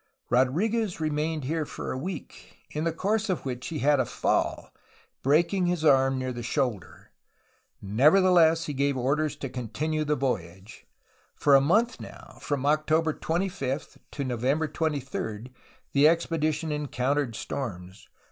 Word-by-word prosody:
Rodriguez 180 - +1
remained 155 0 -1
here 155 +4 -1
for - - -6
a - - -3
week, 95 - -8
in 160 +2 -1
course 215 +5 -1
of 180 -6 -2
which 125 -1 -4
he 165 - -4
had 145 -1 +4
a 130 - +2
fall, - - -1 0.5
breaking 170 +6 +2
his 175 -3 -1
arm 135 -2 +4
near 130 0 -3
the 120 - -6
shoulder. 120 - -3 0.7
Nevertheless, 165 - +4
he 150 - -4
gave 140 0 0
orders 145 +4 0
to 135 - -5
continue 130 +6 -3
the 150 0 +1
voyage. 95 - -4 0.5
For 145 - +3
a 135 - +8
month 220 - +2
now, - - -12
from 140 -2 -2
October 155 +2 +2
25 165 -6 -3
to 140 - -3
November 130 +5 0
23, 135 -7 -3 0.4
the 145 +2 +6
expedition 160 -1 0
encountered 140 -3 -1
storms. 95 -6 -6
145 Hz, 140 wpm, -27 LUFS, 130-160 Hz, 0.7 s, a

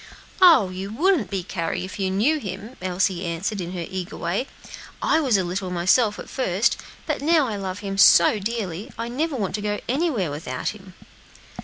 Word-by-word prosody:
"Oh! 315 - +7
you 190 +2 -6
wouldn't 300 - +2
be, 195 -2 -2
Carry, 170 0 -3
if 190 - -9
you 190 -1 0
knew 230 +12 +2
him," 210 +2 -7
Elsie 185 0 0
answered, 180 +4 -2
in 175 +1 -5
her 175 -2 -4
eager 185 -2 -5
way; 200 +10 -2 0.5
"I - - +2
was 260 -9 +3
a 190 - +1
little 180 +1 -3
myself, 190 +5 +2
at - - -8
first, 220 -2 +1 0.3
but - - -2
now 315 0 +4
I 220 - -3
love 195 0 -5
him 195 -1 -4
so 180 +2 +7
dearly, 205 0 -4
I 230 +1 -4
never 295 +5 -1
want 205 -7 -2
to 210 - -2
go 205 0 -2
anywhere 255 - 0
without 145 -4 -3
him." 190 -3 -11
195 Hz, 190 wpm, -23 LUFS, 185-235 Hz, 0.5 s, Oh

